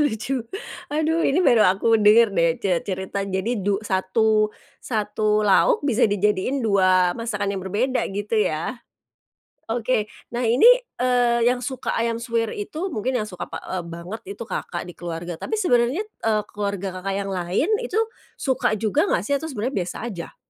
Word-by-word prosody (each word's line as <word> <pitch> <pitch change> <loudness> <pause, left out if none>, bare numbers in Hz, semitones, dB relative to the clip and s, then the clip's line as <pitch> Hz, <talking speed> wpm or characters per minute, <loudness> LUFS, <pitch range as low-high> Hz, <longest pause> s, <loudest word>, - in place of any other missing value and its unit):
Lucu, 255 +1 -1 0.5
aduh 315 +2 0
ini 330 +4 +2
baru 235 -7 +5
aku 215 +4 +3
denger 215 +1 +6
deh 170 -3 +3
ce 180 -4 0
cerita 190 +1 -3
jadi 200 +4 -2
du 200 +1 +1
satu 215 +3 +2 0.3
satu 215 -1 0
lauk 290 - +4
bisa 245 -4 +3
dijadiin 210 +6 0
2 185 -3 +4
masakan 210 -3 -2
yang 195 - -3
berbeda, 215 +8 0 0.2
gitu 205 +1 -5 0.2
ya. 160 +10 -4 0.9
Oke, 225 -1 0 0.2
nah 240 0 -1
ini, 235 +4 +2 0.3
eee, 245 -1 +2
yang 250 - 0
suka 255 +1 -4
ayam 230 0 -1
suwir 230 -1 -1
itu, 310 - -4
mungkin 255 - -1
yang 215 - -2
suka 180 -4 -7
pa - - -5
eee, 185 -1 -3
banget 170 +6 -8 0.2
itu - - -5
Kakak 175 -5 -4
di 175 - -9
keluarga, 175 0 -5
tapi 440 - -3
sebenernya, 290 - +2
eee, 220 - -1
keluarga 200 -2 -4
Kakak 195 0 -2
yang - - -4
lain 180 - 0 0.2
itu - - -2 0.4
suka 255 -5 0
juga 210 -2 +1
nggak 175 - +1
sih 285 - +1
atau 320 +3 -3
sebenernya 255 +1 -3
biasa 175 - -6
aja? 180 -7 -7
215 Hz, 165 wpm, -23 LUFS, 195-245 Hz, 0.9 s, denger